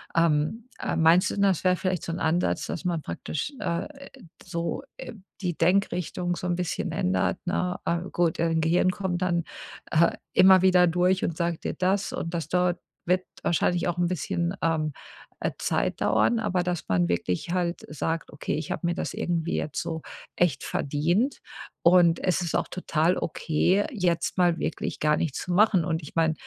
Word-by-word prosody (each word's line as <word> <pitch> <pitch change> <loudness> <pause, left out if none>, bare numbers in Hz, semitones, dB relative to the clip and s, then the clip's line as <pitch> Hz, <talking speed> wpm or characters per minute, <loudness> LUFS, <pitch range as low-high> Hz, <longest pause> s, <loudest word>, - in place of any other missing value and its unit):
Ähm, 165 +8 +1
äh, - - -2
meinst 165 +3 +5
du - - -3
denn, 200 - 0
das 190 -3 +2
wäre 185 0 +5
vielleicht 185 -2 -2
so 165 - -3
'n 170 - -4
Ansatz, 165 +2 0
dass 180 - -5
man 170 -3 0
praktisch, 145 - -4
äh, 170 0 -2 0.5
so, 170 0 -3
äh, - - -8 0.3
die 175 -4 -2
Denkrichtung 180 -1 +1
so 180 - -4
'n 175 - +1
bisschen 175 -1 -2
ändert, 185 +1 0
ne? 180 0 -1
Äh, 170 - 0
gut, 170 -2 +1
dein 165 0 +1
Gehirn 175 +3 +3
kommt 180 -2 -3
dann, 175 -2 +1 0.5
äh, 165 +2 +4 0.2
immer 185 0 +7
wieder 180 -1 +5
durch 180 +2 +2
und 165 - -2
sagt 170 -1 -2
dir - - -1
das 190 +2 0
und 165 - -4
das 165 -2 -2
dort 180 -1 +1 0.3
wird 180 +1 +2 0.2
wahrscheinlich 175 +1 +1
auch 175 0 -2
'n 175 - +2
bisschen, 170 +1 -2
ähm, 155 -2 +1 0.5
äh, - - -1
Zeit - - -1
dauern, 235 - +3
aber 190 -5 0
dass 175 -2 -2
man 90 -2 +2
wirklich 90 - -1
halt 175 -1 -1
sagt: 165 +1 -3
„Okay, 145 - -3
ich 155 0 -4
habe 170 - -2
mir 175 - 0
das - - -3
irgendwie 170 -1 -1
jetzt 150 - -3
so 160 -1 -4 0.3
echt 150 -6 +1
verdient 170 - 0 0.5
und 170 -1 +5
es 185 0 +1
ist 170 -2 -2
auch - - 0
total 170 -1 0
okay, 175 +5 +1
jetzt 180 - 0
mal 175 -2 +3
wirklich - - -3
gar 150 0 +2
nichts 155 -5 -2
zu 180 - -3
machen.“ 195 -3 +4
Und 165 -1 -1
ich 150 - -11
meine, 165 -1 +3
175 Hz, 185 wpm, -26 LUFS, 165-180 Hz, 0.5 s, immer